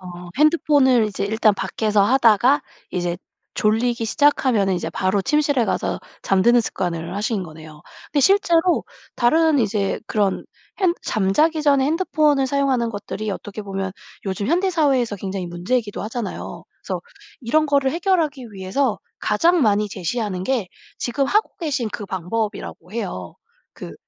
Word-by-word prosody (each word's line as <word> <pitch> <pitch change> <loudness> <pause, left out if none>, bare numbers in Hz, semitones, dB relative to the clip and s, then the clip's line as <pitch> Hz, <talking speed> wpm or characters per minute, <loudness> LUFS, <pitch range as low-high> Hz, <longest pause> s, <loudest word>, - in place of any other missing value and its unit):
어 185 - -12 0.3
핸드폰을 290 -7 +4
이제 200 -1 -3
일단 215 0 +2
밖에서 205 +2 0
하다가 255 +3 +4 0.3
이제 175 -1 -2 0.4
졸리기 230 +2 +1
시작하면은 245 - +2
이제 175 - -3
바로 190 +2 0
침실에 285 -3 +2
가서 - - -1 0.2
잠드는 235 +6 +4
습관을 175 -3 -3
하신 210 -1 -1
거네요. 155 -2 -12 0.3
근데 290 - +2
실제로 350 +1 +3 0.3
다른 315 +5 +3
이제 205 -2 0
그런 205 -3 0 0.4
핸 360 -2 +3
잠자기 300 +11 +1
전에 280 -2 +4
핸드폰을 305 -3 +2
사용하는 265 -3 +1
것들이 210 0 -5
어떻게 205 +2 -6
보면 195 -1 -4 0.3
요즘 195 +1 -2
현대 365 +4 +2
사회에서 270 - +1
굉장히 190 -1 -4
문제이기도 205 +6 -2
하잖아요. 225 0 -5 0.2
그래서 - - -3 0.4
이런 305 +6 +2
거를 280 -2 +2
해결하기 325 -7 0
위해서 200 +6 -1 0.2
가장 330 +11 +3
많이 210 -1 +3
제시하는 190 0 -3
게 230 -6 -1 0.3
지금 270 +3 -1
하고 425 +9 +1
계신 285 -8 -1
그 205 - -6
방법이라고 190 -1 -4
해요. 185 - -5 0.4
그 - - -9
230 Hz, 340 characters per minute, -21 LUFS, 195-285 Hz, 0.4 s, 핸드폰을